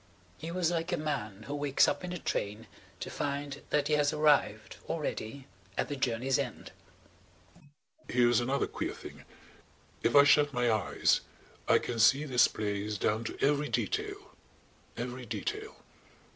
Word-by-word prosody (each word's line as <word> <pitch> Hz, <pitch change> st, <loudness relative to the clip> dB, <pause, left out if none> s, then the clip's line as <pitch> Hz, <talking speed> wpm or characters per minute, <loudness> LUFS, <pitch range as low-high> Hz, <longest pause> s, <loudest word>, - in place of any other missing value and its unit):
He 160 Hz, -, -6 dB
was 175 Hz, -1 st, 0 dB
like 165 Hz, +1 st, -1 dB
a 175 Hz, -, +1 dB
man 110 Hz, -10 st, -3 dB
who 140 Hz, -, -6 dB
wakes 145 Hz, -1 st, +3 dB
up -, -, -1 dB
in 180 Hz, -, -4 dB
a 180 Hz, -, -3 dB
train 105 Hz, -7 st, -3 dB, 0.4 s
to -, -, -5 dB
find 140 Hz, 0 st, -3 dB
that 145 Hz, -1 st, +1 dB
he 155 Hz, -, +1 dB
has 145 Hz, -1 st, +3 dB
arrived, 145 Hz, -8 st, +2 dB
already, 140 Hz, -5 st, -4 dB, 0.3 s
at -, -, 0 dB
the 145 Hz, -, -2 dB
journey's 130 Hz, +1 st, 0 dB
end. 125 Hz, -5 st, -5 dB, 1.4 s
"Here's 120 Hz, -1 st, +4 dB
another 130 Hz, +3 st, 0 dB
queer -, -, -4 dB
thing. -, -, -11 dB, 0.8 s
If 115 Hz, -, +1 dB
I 140 Hz, -, +10 dB
shut 145 Hz, 0 st, +4 dB
my 125 Hz, -1 st, +2 dB
eyes 110 Hz, -2 st, +2 dB, 0.5 s
I -, -, +6 dB
can 120 Hz, -2 st, -3 dB
see 135 Hz, +6 st, +5 dB
this 125 Hz, -5 st, +4 dB
place 105 Hz, 0 st, -3 dB
down 110 Hz, +4 st, 0 dB
to -, -, -5 dB
every 145 Hz, 0 st, +1 dB
detail–every 120 Hz, +2 st, -5 dB
detail. 105 Hz, -2 st, -4 dB
135 Hz, 150 wpm, -31 LUFS, 115-145 Hz, 1.4 s, I